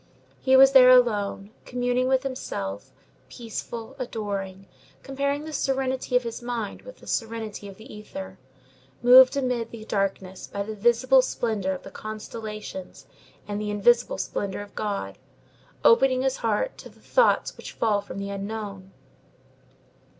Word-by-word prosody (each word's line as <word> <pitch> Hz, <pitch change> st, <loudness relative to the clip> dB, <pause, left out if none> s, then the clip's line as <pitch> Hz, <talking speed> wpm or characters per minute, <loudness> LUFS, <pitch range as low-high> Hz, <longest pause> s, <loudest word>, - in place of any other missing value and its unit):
He 260 Hz, 0 st, +3 dB
was 270 Hz, +1 st, +8 dB
there 260 Hz, -2 st, +8 dB
alone, 210 Hz, -5 st, +3 dB
communing 245 Hz, 0 st, 0 dB
with 260 Hz, 0 st, +2 dB
himself, 100 Hz, -, -5 dB, 0.4 s
peaceful, 230 Hz, +1 st, -7 dB
adoring, 200 Hz, -5 st, -4 dB, 0.4 s
comparing 280 Hz, +2 st, -2 dB
the 310 Hz, 0 st, -7 dB
serenity 265 Hz, -2 st, -1 dB
of 250 Hz, -, +4 dB
his 230 Hz, +1 st, -6 dB
heart 240 Hz, -4 st, -4 dB
with -, -, -12 dB
the -, -, -17 dB
serenity 225 Hz, -3 st, -4 dB
of 195 Hz, -1 st, -11 dB
the 225 Hz, +5 st, -12 dB
ether, 95 Hz, -, -9 dB, 0.6 s
moved 255 Hz, +2 st, +8 dB
amid 250 Hz, -4 st, -1 dB
the 220 Hz, -2 st, -10 dB
darkness 195 Hz, -2 st, -2 dB
by 200 Hz, -, -4 dB
the 215 Hz, +2 st, -6 dB
visible 240 Hz, +5 st, +4 dB
splendor 220 Hz, -6 st, -2 dB
of 185 Hz, -, -8 dB
the 195 Hz, -, -10 dB
constellations 215 Hz, -3 st, -7 dB, 0.4 s
and 205 Hz, 0 st, -3 dB
the 210 Hz, -, -3 dB
invisible 235 Hz, +4 st, +3 dB
splendor 200 Hz, 0 st, -3 dB
of 205 Hz, -1 st, -11 dB
God, 200 Hz, -, -4 dB, 0.7 s
opening 255 Hz, +2 st, +5 dB
his 265 Hz, 0 st, 0 dB
heart 225 Hz, -, -1 dB
to -, -, -10 dB
the -, -, -22 dB
thoughts -, -, +2 dB
which -, -, -9 dB
fall 210 Hz, -3 st, +1 dB
from 200 Hz, -, -9 dB
the 200 Hz, 0 st, -4 dB
Unknown. 200 Hz, -1 st, -6 dB
225 Hz, 145 wpm, -25 LUFS, 200-255 Hz, 0.7 s, was